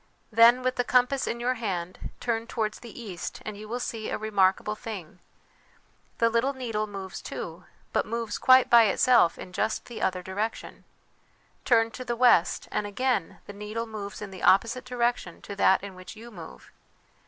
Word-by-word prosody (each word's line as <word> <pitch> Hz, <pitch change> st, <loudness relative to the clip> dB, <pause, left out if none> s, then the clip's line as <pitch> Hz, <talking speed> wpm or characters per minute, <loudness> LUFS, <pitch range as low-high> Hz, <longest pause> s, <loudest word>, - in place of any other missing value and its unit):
" -, -, -40 dB
Then, 235 Hz, +3 st, +6 dB
with 255 Hz, 0 st, 0 dB
the 245 Hz, -, +2 dB
compass 250 Hz, +2 st, +2 dB
in 235 Hz, -, -2 dB
your 245 Hz, +2 st, +1 dB
hand, 185 Hz, -7 st, -4 dB
turn 230 Hz, -1 st, -2 dB
towards 220 Hz, -4 st, -2 dB
the 235 Hz, 0 st, -11 dB
east, 195 Hz, -7 st, -6 dB
and 215 Hz, -, -5 dB
you 210 Hz, +1 st, -9 dB
will 245 Hz, +2 st, -3 dB
see 225 Hz, -2 st, -4 dB
a -, -, -2 dB
remarkable 205 Hz, -1 st, +1 dB
thing. 200 Hz, -6 st, -8 dB, 1.0 s
The 230 Hz, -, +3 dB
little 235 Hz, +4 st, +1 dB
needle 225 Hz, -5 st, -3 dB
moves, 195 Hz, -2 st, -7 dB
too, -, -, -7 dB, 0.3 s
but -, -, +1 dB
moves 230 Hz, -2 st, -3 dB
quite 255 Hz, 0 st, +6 dB
by 235 Hz, -1 st, +7 dB
itself 215 Hz, -3 st, +4 dB
in 180 Hz, -, -10 dB
just 220 Hz, +4 st, -1 dB
the 240 Hz, -, -8 dB
other 185 Hz, -1 st, 0 dB
direction. 205 Hz, +5 st, -4 dB, 0.8 s
Turn 230 Hz, -2 st, +4 dB
to 255 Hz, -, -7 dB
the 240 Hz, -1 st, -2 dB
west, 235 Hz, -8 st, +3 dB
and 205 Hz, -, -1 dB
again 250 Hz, -3 st, -1 dB
the 205 Hz, -, -9 dB
needle 210 Hz, +3 st, -5 dB
moves 210 Hz, -2 st, -7 dB
in 200 Hz, -, -8 dB
the 185 Hz, -, -9 dB
opposite 230 Hz, +6 st, +3 dB
direction 240 Hz, -7 st, -1 dB
to 200 Hz, -, -7 dB
that 190 Hz, -1 st, +4 dB
in 200 Hz, -1 st, -7 dB
which 185 Hz, +3 st, -11 dB
you 230 Hz, +2 st, -11 dB
move. 170 Hz, -6 st, -12 dB
220 Hz, 185 wpm, -27 LUFS, 200-240 Hz, 1.0 s, by